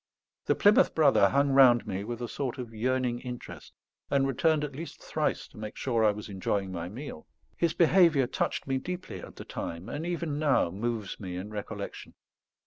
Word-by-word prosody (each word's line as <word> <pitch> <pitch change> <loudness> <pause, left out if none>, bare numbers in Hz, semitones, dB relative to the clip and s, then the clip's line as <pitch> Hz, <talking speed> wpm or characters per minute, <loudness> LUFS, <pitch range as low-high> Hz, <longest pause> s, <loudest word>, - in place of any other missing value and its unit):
The - - +3
Plymouth 205 +1 +5
Brother 140 -10 +5
hung 140 +3 +2
round 125 -4 +6
me 100 -2 -3
with 120 +2 -5
a - - -2
sort 130 0 -3
of 120 -3 -7
yearning 125 +1 0
interest, 125 -1 -8 0.4
and 140 -1 +3
returned 150 +3 +2
at 145 -2 -5
least 165 +4 -7
thrice - - -2
to - - -14
make 110 -1 -6
sure 115 -4 +1
I 110 - +6
was 105 0 -4
enjoying 95 -1 -2
my 85 -1 -4
meal. 115 - -8 0.3
His 170 -2 0
behaviour 165 -5 +5
touched - - -2
me 135 -1 0
deeply 180 +5 -6
at - - -11
the - - -9
time, 85 +3 -6
and 145 - -4
even 170 -4 -2
now 145 - +2
moves 110 +1 -3
me 90 -3 -6
in 95 +4 -6
recollection. 105 -1 -6
125 Hz, 190 wpm, -29 LUFS, 105-145 Hz, 0.4 s, round